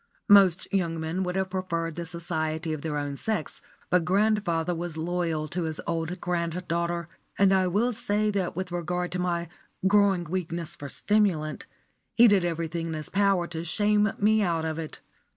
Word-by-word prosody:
Most 190 -3 +6
young 170 -4 0
men 160 +4 -2
would 180 -1 -2
have 190 -1 -1
chosen 170 -3 -2
the 170 +1 -5
society 160 -1 -2
of 155 - -5
their 150 -1 -2
own 145 -1 -3
sex, 205 +1 -2 0.3
but 180 -1 +4
grandfather 185 -3 +1
was 170 -1 -5
loyal 165 -2 -1
to 175 +2 -2
his 160 0 -4
old 165 +1 -2
granddaughter; 170 -1 -2 0.3
and 195 -1 +5
I 190 -1 +3
will 220 +7 +1
say 210 -1 0
that 190 -5 -2
with 185 0 -4
regard 175 +1 -2
to 180 - -3
my 175 -1 -1 0.4
growing 200 -2 +4
weakness 170 -1 -4
for 145 -4 -8
stimulant, 185 -8 0 0.5
he 240 +1 +8
did 200 -4 +4
everything 165 0 -2
in 165 - -3
his 155 -1 -5
power 195 -3 +2
to 165 -1 -4
shame 210 +4 +2
me 215 +1 +3
out 165 -4 0
of 160 0 -3
it. 160 -2 -7
175 Hz, 175 wpm, -27 LUFS, 165-190 Hz, 0.5 s, he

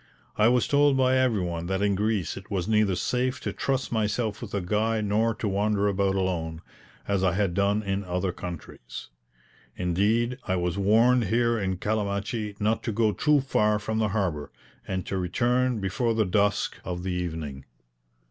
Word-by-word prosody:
I 110 - +4
was 125 0 +3
told 145 -1 +4
by 130 0 +3
everyone 90 -10 0
that 95 +2 -1
in 100 -1 +2
Greece 105 -4 -1
it - - -10
was 95 -3 -2
neither 105 -3 +2
safe 125 +6 -1
to - - -3
trust 135 -1 -1
myself 110 -1 -1
with - - -7
a - - +1
guide 105 +4 0
nor 110 +2 +1
to 110 - -3
wander 100 +1 +1
about 100 -1 +1
alone, 85 -4 -2 0.4
as 100 -2 0
I 95 -2 +3
had 95 -2 0
done 100 +3 +1
in 100 0 -2
other 90 0 -1
countries; 85 -9 -8 0.7
indeed, 105 +8 +1
I 95 - +1
was 90 -1 -1
warned 115 +5 +4
here 115 +3 +1
in 95 -2 -1
Calamachi 105 +1 -2
not 110 +2 +1
to 115 - 0
go 110 0 +2
too 150 +6 +2
far 105 -5 +2
from 110 +1 -2
the 110 - +2
harbour, 95 -8 -2 0.4
and 95 -1 -3
to 95 - -2
return 120 +6 +1
before 110 +4 0
the 110 -1 +2
dusk 100 +2 +1
of 90 0 -4
the 95 - -2
evening. 80 -6 -4
105 Hz, 175 wpm, -26 LUFS, 95-115 Hz, 0.7 s, I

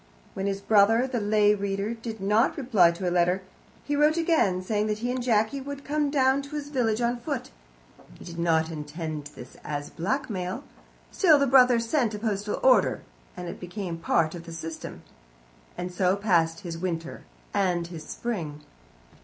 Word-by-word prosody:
When 195 +1 -3
his 195 0 -2
brother, 220 +4 +4
the 255 -2 -2
lay 210 0 +3
reader, 200 +1 -2
did 225 -1 -7
not 210 +5 +2
reply 225 - +4
to 170 +2 -3
a - - +1
letter, 180 +2 +2 0.4
he 290 - -1
wrote 300 +2 +3
again, 315 - +2
saying 210 +2 0
that 210 -1 -1
he 240 +3 -2
and 255 0 -2
Jacky 230 +2 +1
would 280 +1 -7
come 295 0 0
down 270 -1 +3
to 280 +2 -9
his 290 -1 -4
village 240 -5 0
on 240 +1 0
foot. 275 +1 -4 0.7
He - - -12
did 170 -1 -8
not 165 -1 +2
intend 155 0 -5
this 125 - -11
as 145 -1 -5
blackmail. 200 - -3 0.5
Still, 325 -6 +5
the 280 - +3
brother 255 -2 +6
sent 230 -1 0
a - - -4
postal 210 -1 -2
order, 195 - +4 0.3
and 180 - -6
it - - -7
became 180 -2 -5
part 165 -1 +1
of 170 -1 -8
the 165 - -7
system. 165 -1 -7 0.7
And 180 +1 -4
so 180 +1 +2
passed 175 -4 +1
his 170 -4 -6
winter 170 -2 -4 0.3
and 180 -4 +1
his 170 -2 -8
spring. 160 -7 -5
205 Hz, 180 wpm, -26 LUFS, 175-245 Hz, 0.7 s, brother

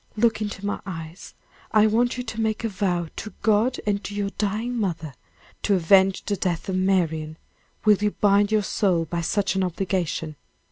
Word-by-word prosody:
Look 225 0 +2
into 205 -1 -4
my 205 - -2
eyes. 165 -2 -8 0.4
I 215 0 +5
want 235 +3 +2
you 250 - -3
to 225 -2 -4
make 220 0 -1
a 225 - 0
vow 180 -4 -1
to 215 - -6
God 220 +4 +2
and 205 -1 0
to 205 +2 -6
your 200 -1 -1
dying 215 +5 -2
mother, 170 - -2 0.5
to 205 - +2
avenge 190 +2 +4
the 205 - 0
death 175 -3 -2
of 190 - -1
Marian. 165 -5 0 0.5
Will 210 -1 +6
you 210 +1 +1
bind 205 0 +2
your 215 -1 +3
soul 180 -4 +1
by 170 +2 -3
such 195 +4 0
an 190 -1 0
obligation?" 175 -4 -2
200 Hz, 185 wpm, -24 LUFS, 175-215 Hz, 0.5 s, Will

